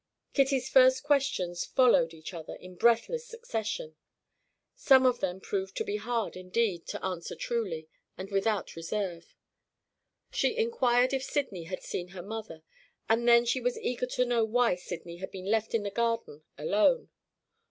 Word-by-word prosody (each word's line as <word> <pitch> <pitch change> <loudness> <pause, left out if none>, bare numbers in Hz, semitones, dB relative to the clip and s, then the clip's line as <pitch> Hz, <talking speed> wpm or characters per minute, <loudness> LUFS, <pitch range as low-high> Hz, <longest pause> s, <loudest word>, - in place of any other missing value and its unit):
Kitty's 270 -2 +2
first 260 0 +5
questions 270 -12 +1
followed 245 -10 +4
each 160 +2 -9
other 165 -2 -7
in 185 0 -12
breathless 235 - +2
succession. 225 - -4 0.8
Some 270 - +5
of 250 -1 +3
them 185 -1 -2
proved 390 - -4
to 445 - 0
be 420 -1 -2
hard, 240 - -2
indeed, 185 0 -1
to - - -5
answer 180 -3 -4
truly, 185 -10 -3 0.3
and 190 +2 -7
without 200 0 0
reserve. 170 0 -4 1.0
She - - 0
inquired 255 - +2
if 265 - 0
Sydney 230 - -2
had 185 +2 -6
seen 175 - -4
her 180 -1 -9
mother, 205 -6 -7 0.4
and 230 +2 +2
then 235 0 +7
she 250 +2 0
was 245 0 0
eager 250 0 -2
to 250 0 0
know 240 -2 +2
why 235 +1 +3
Sydney 175 -1 -7
had 190 +2 -6
been 185 -1 -8
left 225 0 +1
in 220 - +1
the 200 - -3
garden 230 -8 -1 0.2
alone. 210 - +2
225 Hz, 160 wpm, -29 LUFS, 185-255 Hz, 1.0 s, then